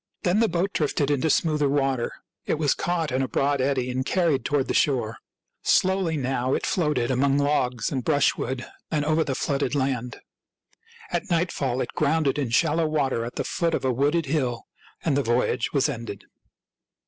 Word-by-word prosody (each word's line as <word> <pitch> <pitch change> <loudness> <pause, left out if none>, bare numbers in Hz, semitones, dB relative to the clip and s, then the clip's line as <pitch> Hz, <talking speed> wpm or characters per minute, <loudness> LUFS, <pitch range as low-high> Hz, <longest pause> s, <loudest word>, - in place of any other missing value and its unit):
Then 180 +4 +2
the 230 - +4
boat 180 +3 -1
drifted 145 -2 0
into 145 +3 +1
smoother 150 -2 +2
water. 135 -3 0 0.4
It - - +1
was 150 -3 +2
caught 170 -3 -1
in 130 +1 0
a 135 - 0
broad 140 0 +1
eddy 130 -2 0
and 130 +1 -1
carried 160 -5 +1
toward 145 -1 0
the - - -1
shore. 120 -6 +1 0.4
Slowly 185 -4 +2
now 130 -1 0
it - - -2
floated 150 -8 0
among 135 +2 +2
logs 125 -5 0
and 130 -3 -2
brushwood 135 -3 +1 0.2
and 150 -2 0
over 155 +1 +2
the 135 - -2
flooded 140 0 -1
land. 130 -3 -2 0.9
At 215 - -2
night 175 0 +1
fall 130 -2 -1
it - - -4
grounded 150 -2 +1
in 135 -5 -1
shallow 155 +7 +2
water 140 -6 0
at 120 - -6
the - - -1
foot 165 -1 0
of - - -3
a 130 - +2
wooded 145 +6 +1
hill; 130 -5 -1 0.4
and 155 -5 +2
the 140 - +2
voyage 120 -1 0
was 140 -1 +2
ended. 115 -7 -6
140 Hz, 185 wpm, -25 LUFS, 130-155 Hz, 0.9 s, the